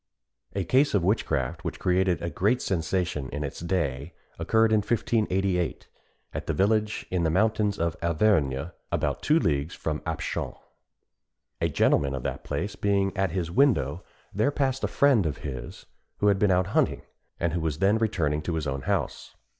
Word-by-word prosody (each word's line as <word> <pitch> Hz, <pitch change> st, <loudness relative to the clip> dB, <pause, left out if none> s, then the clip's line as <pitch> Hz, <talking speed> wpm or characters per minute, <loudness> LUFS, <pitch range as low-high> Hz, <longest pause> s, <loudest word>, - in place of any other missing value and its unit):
A 100 Hz, -, 0 dB
case 130 Hz, -, +3 dB
of 95 Hz, -, +2 dB
witchcraft, 85 Hz, -, 0 dB
which -, -, -4 dB
created 90 Hz, -2 st, +1 dB
a 85 Hz, -, -2 dB
great 105 Hz, +11 st, +1 dB
sensation 85 Hz, -, -1 dB
in 75 Hz, +1 st, -4 dB
its 70 Hz, -, -5 dB
day, 85 Hz, -4 st, -2 dB, 0.2 s
occurred 110 Hz, 0 st, +3 dB
in 110 Hz, -, +5 dB
1588, 100 Hz, -5 st, 0 dB, 0.5 s
at -, -, -5 dB
a -, -, +2 dB
village 105 Hz, +5 st, +1 dB
in 90 Hz, -1 st, +1 dB
the 80 Hz, -, +2 dB
mountains 105 Hz, +3 st, +1 dB
of 85 Hz, -2 st, -1 dB
Auvergne, 80 Hz, -4 st, +1 dB, 0.2 s
about -, -, -1 dB
two 155 Hz, -, +3 dB
leagues 75 Hz, -, 0 dB
from 75 Hz, -1 st, -3 dB
Apchon. 80 Hz, -2 st, -3 dB, 1.1 s
A -, -, +2 dB
gentleman 70 Hz, -1 st, +2 dB
of 65 Hz, -, -5 dB
that -, -, -4 dB
place 100 Hz, +8 st, -3 dB
being 100 Hz, -1 st, +1 dB
at 95 Hz, -1 st, +1 dB
his 85 Hz, -1 st, -3 dB
window, 95 Hz, -, +2 dB, 0.3 s
there 110 Hz, +7 st, +2 dB
passed 135 Hz, -2 st, -1 dB
a -, -, +2 dB
friend 130 Hz, -, +3 dB
of 75 Hz, 0 st, -3 dB
his 65 Hz, -3 st, -7 dB, 0.3 s
who 105 Hz, -, +3 dB
had 100 Hz, -1 st, +2 dB
been 105 Hz, -, +3 dB
out 90 Hz, 0 st, +3 dB
hunting, -, -, +1 dB, 0.4 s
and 85 Hz, -2 st, 0 dB
who 85 Hz, -, -1 dB
was 80 Hz, -2 st, -1 dB
then 100 Hz, +4 st, +3 dB
returning 80 Hz, -9 st, 0 dB
to 80 Hz, +2 st, -3 dB
his 80 Hz, -1 st, -2 dB
own 70 Hz, -1 st, -2 dB
house. -, -, -2 dB
90 Hz, 175 wpm, -27 LUFS, 80-105 Hz, 1.1 s, in